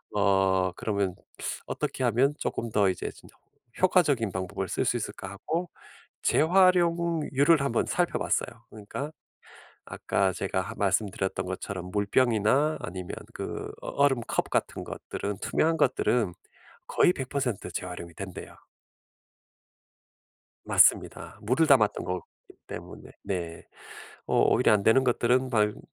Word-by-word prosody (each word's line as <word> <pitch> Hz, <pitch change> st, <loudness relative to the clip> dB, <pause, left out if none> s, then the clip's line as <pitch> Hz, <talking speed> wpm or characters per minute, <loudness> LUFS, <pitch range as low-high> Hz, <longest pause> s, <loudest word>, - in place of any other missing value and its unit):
어 95 Hz, -2 st, +3 dB
그러면 100 Hz, -2 st, -2 dB, 0.5 s
어떻게 -, -, -3 dB
하면 125 Hz, +5 st, +3 dB
쪼끔 115 Hz, -, -3 dB
더 100 Hz, -2 st, +3 dB
이제 90 Hz, -, -3 dB
'진짜 -, -, -18 dB, 0.5 s
효과적인 145 Hz, -, +3 dB
방법을 95 Hz, +1 st, -4 dB
쓸 -, -, 0 dB
수 -, -, +1 dB
있을까?' 95 Hz, -, -6 dB
하고 165 Hz, -, -3 dB, 0.5 s
재활용률을 170 Hz, -3 st, +3 dB
한번 120 Hz, -4 st, 0 dB
살펴봤어요. 130 Hz, -8 st, -1 dB
그러니까 110 Hz, +7 st, -6 dB, 0.8 s
아까 95 Hz, -1 st, 0 dB
제가 95 Hz, 0 st, -2 dB
하 90 Hz, -, -7 dB
말씀드렸던 95 Hz, -2 st, -1 dB
것처럼 95 Hz, 0 st, -5 dB
물병이나 115 Hz, +7 st, +2 dB
아니면 90 Hz, 0 st, -6 dB, 0.2 s
그 -, -, -5 dB
어 -, -, -9 dB
얼음 140 Hz, -3 st, +2 dB
컵 -, -, -1 dB
같은 -, -, -1 dB
것들은 100 Hz, -1 st, -5 dB
투명한 165 Hz, +1 st, +1 dB
것들은 120 Hz, -, +1 dB, 0.5 s
거의 175 Hz, -, +4 dB
100% 130 Hz, -, -3 dB
재활용이 90 Hz, -2 st, -6 dB
된대요. 95 Hz, 0 st, -8 dB, 2.1 s
맞습니다. -, -, +3 dB
물을 130 Hz, +9 st, +2 dB
담았던 120 Hz, -8 st, +4 dB
거기 90 Hz, 0 st, -3 dB, 0.4 s
때문에 -, -, -9 dB
네 85 Hz, -4 st, -4 dB, 0.6 s
어 -, -, 0 dB
오히려 -, -, +4 dB
안 105 Hz, -, +3 dB
되는 120 Hz, +5 st, +5 dB
것들은 125 Hz, +1 st, +2 dB
방금 105 Hz, -3 st, +1 dB
110 Hz, 275 characters per minute, -27 LUFS, 95-140 Hz, 2.1 s, 되는